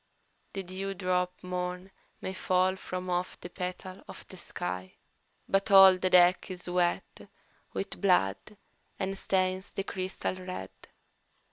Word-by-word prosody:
"The 195 Hz, -, -3 dB
dewdrop 185 Hz, -1 st, -2 dB
morn 180 Hz, +1 st, -4 dB, 0.3 s
may 190 Hz, -, -4 dB
fall 185 Hz, 0 st, +2 dB
from 185 Hz, -1 st, -5 dB
off 180 Hz, 0 st, -2 dB
the 175 Hz, -, -9 dB
petal 185 Hz, +1 st, -6 dB
of -, -, -11 dB
the 185 Hz, -, -11 dB
sky, 95 Hz, -, -5 dB, 0.5 s
But 195 Hz, +2 st, +1 dB
all 190 Hz, -1 st, +9 dB
the 185 Hz, -, +1 dB
deck 180 Hz, +1 st, +5 dB
is 180 Hz, -1 st, -8 dB
wet 175 Hz, -1 st, -1 dB, 0.4 s
with 195 Hz, -, -4 dB
blood 180 Hz, -, +2 dB, 0.4 s
and 195 Hz, 0 st, -2 dB
stains 185 Hz, 0 st, 0 dB
the 195 Hz, -, -4 dB
crystal 185 Hz, -2 st, -3 dB
red. 185 Hz, 0 st, -6 dB
185 Hz, 130 wpm, -30 LUFS, 180-190 Hz, 0.5 s, all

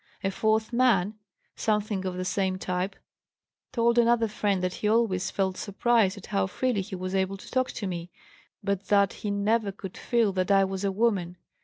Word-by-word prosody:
A 195 Hz, -, +1 dB
fourth 220 Hz, +3 st, +1 dB
man, 230 Hz, -6 st, +3 dB, 0.4 s
something 210 Hz, -3 st, -1 dB
of 185 Hz, -1 st, -3 dB
the 185 Hz, -, -3 dB
same 185 Hz, 0 st, 0 dB
type, 185 Hz, +1 st, -2 dB, 0.8 s
told 235 Hz, -1 st, +3 dB
another 235 Hz, -1 st, +4 dB
friend 205 Hz, -3 st, -1 dB
that 180 Hz, 0 st, 0 dB
he 210 Hz, -, +1 dB
always 215 Hz, -5 st, +2 dB
felt 190 Hz, -1 st, -1 dB
surprised 215 Hz, -1 st, +2 dB
at 200 Hz, -, -10 dB
how 95 Hz, 0 st, 0 dB
freely 245 Hz, -, 0 dB
he 190 Hz, +1 st, -6 dB
was 185 Hz, +1 st, -4 dB
able 190 Hz, 0 st, 0 dB
to -, -, -13 dB
talk 255 Hz, 0 st, +1 dB
to 210 Hz, -, -4 dB
me, 175 Hz, -2 st, -4 dB, 0.5 s
but 200 Hz, -1 st, -1 dB
that 200 Hz, -1 st, +3 dB
he 210 Hz, -, -2 dB
never 205 Hz, +1 st, +1 dB
could 190 Hz, -1 st, -9 dB
feel 230 Hz, -5 st, +1 dB
that 185 Hz, 0 st, -1 dB
I 195 Hz, -1 st, +5 dB
was 190 Hz, 0 st, -4 dB
a 200 Hz, -, +1 dB
woman. 190 Hz, -4 st, 0 dB
200 Hz, 190 wpm, -27 LUFS, 185-220 Hz, 0.8 s, I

